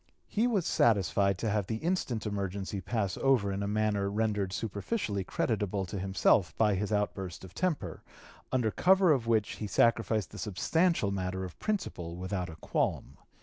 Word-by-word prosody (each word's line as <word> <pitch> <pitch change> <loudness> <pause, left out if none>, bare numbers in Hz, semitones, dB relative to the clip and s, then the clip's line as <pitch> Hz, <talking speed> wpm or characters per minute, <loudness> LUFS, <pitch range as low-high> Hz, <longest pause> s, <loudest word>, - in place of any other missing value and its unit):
He 225 +3 +1
was 205 -8 +1
satisfied 100 -3 +3
to 110 - -1
have 100 -2 0
the 110 - -2
instant 125 -5 -1
emergency 100 -1 -3
pass 100 -4 -2
over 125 -7 +2
in 95 +1 -3
a 100 - -1
manner 105 -1 +1
rendered 105 -2 0
superficially 100 - -2
creditable 100 -1 -1
to 95 +2 -5
himself 95 -2 +2
by 105 -2 +4
his 100 +2 -2
outburst 95 -5 -2
of 90 - -13
temper, 150 - -2 0.5
under 125 -4 +1
cover 190 - +4
of 125 -6 +1
which 110 -3 +1
he 105 - -4
sacrificed 110 -1 +2
the - - -9
substantial 160 - +1
matter 95 -1 -2
of 90 - -10
principle 90 - -3
without 90 0 -3
a 80 - -8
qualm. 70 -3 -2
105 Hz, 165 wpm, -30 LUFS, 95-115 Hz, 0.5 s, by